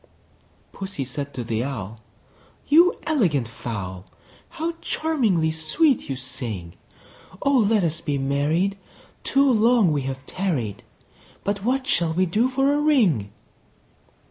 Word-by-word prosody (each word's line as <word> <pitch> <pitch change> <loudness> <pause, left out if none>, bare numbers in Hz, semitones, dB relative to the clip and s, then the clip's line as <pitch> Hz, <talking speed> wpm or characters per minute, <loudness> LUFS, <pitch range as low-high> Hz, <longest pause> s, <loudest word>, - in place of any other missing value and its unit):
II. - - -28 0.6
Pussy 190 -8 -5
said 140 +2 -5
to 125 - -3
the 115 0 -1
Owl, 115 -5 -6 0.7
"You 340 +5 +6
elegant 175 - +1
fowl, 100 -5 -6 0.4
How 330 +1 -3
charmingly 220 - +1
sweet 245 - +1
you 135 - -1
sing! 120 -10 -6 0.7
Oh! 275 -2 +4
let 215 -4 +3
us 165 -1 -1
be 145 -2 -1
married; 150 +9 0 0.4
too 275 0 +3
long 225 -4 +4
we 145 -2 0
have 130 0 -7
tarried: 150 - -2 0.6
But 200 -1 -2
what 260 +3 0
shall 170 -12 +1
we 185 +2 +3
do 215 +9 +1
for 270 +2 +2
a 290 - +1
ring?" 205 - +3
165 Hz, 135 wpm, -23 LUFS, -, 0.7 s, You